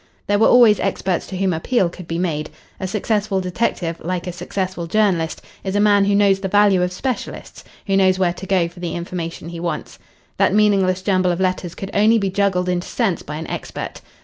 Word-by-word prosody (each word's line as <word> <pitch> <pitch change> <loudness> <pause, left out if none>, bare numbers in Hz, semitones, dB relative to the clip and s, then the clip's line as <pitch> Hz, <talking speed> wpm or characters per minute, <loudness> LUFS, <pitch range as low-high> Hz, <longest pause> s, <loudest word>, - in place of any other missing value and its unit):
There 205 0 +1
were 225 - +5
always 235 -4 +6
experts 190 -2 -1
to 190 - -6
whom 190 -1 +1
appeal 185 +5 +1
could 170 0 -10
be 165 - -3
made. 160 -4 -2 0.3
A 190 - -3
successful 210 0 0
detective, 180 -3 -2
like 180 +1 -3
a 180 - -3
successful 180 0 -4
journalist, 175 -5 +1 0.2
is 190 0 -3
a - - +3
man 205 -1 +4
who 200 0 +2
knows 200 -1 +4
the 195 - -3
value 205 -1 +4
of 180 0 0
specialists 250 +6 -5 0.2
who 195 - +1
knows 190 -1 +4
where 180 -2 +1
to 190 +2 -9
go 185 -3 +2
for 175 +1 -13
the 175 -2 -4
information 170 -1 -5
he 170 -1 -7
wants. 170 0 -4 0.4
That - - +3
meaningless 195 -3 +3
jumble 185 -2 +2
of 175 - -2
letters 185 -1 -1
could 195 0 -6
only 215 +3 +4
be 195 -3 -1
juggled 190 -2 +1
into 180 0 -1
sense 200 -9 -1
by 150 - -7
an 160 +2 -5
expert. - - -6
185 Hz, 210 wpm, -20 LUFS, 175-200 Hz, 0.4 s, always